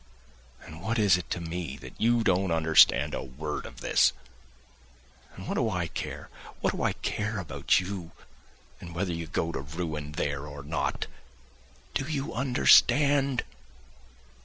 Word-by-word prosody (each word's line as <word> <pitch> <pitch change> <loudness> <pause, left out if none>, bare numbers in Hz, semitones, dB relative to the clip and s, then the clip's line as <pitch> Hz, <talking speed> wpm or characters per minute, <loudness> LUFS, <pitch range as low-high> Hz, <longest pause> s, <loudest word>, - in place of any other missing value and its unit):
And 80 -1 -10
what 115 +5 -1
is 100 -4 +5
it 90 - -5
to - - -2
me 85 -4 -5
that 65 -1 -11
you 115 +1 +3
don't 95 -1 +2
understand 80 -1 +5
a - - -2
word 75 +4 -5
of - - -12
this! - - +4 1.2
And 95 - -9
what - - -1
do 115 - +1
I 90 -4 -1
care, - - -6 0.3
what - - 0
do - - -4
I - - +1
care 105 +1 -3
about 90 -6 +1
you, 90 -2 -5 0.7
and 85 -1 -10
whether 90 0 -1
you 85 0 -4
go 80 +1 -1
to 65 - -4
ruin 75 0 -5
there 70 -1 -2
or 70 -1 -8
not? 75 +4 -2 0.9
Do 135 - -1
you 140 0 -3
understand? 135 +1 +4
85 Hz, 155 wpm, -28 LUFS, 80-110 Hz, 1.2 s, is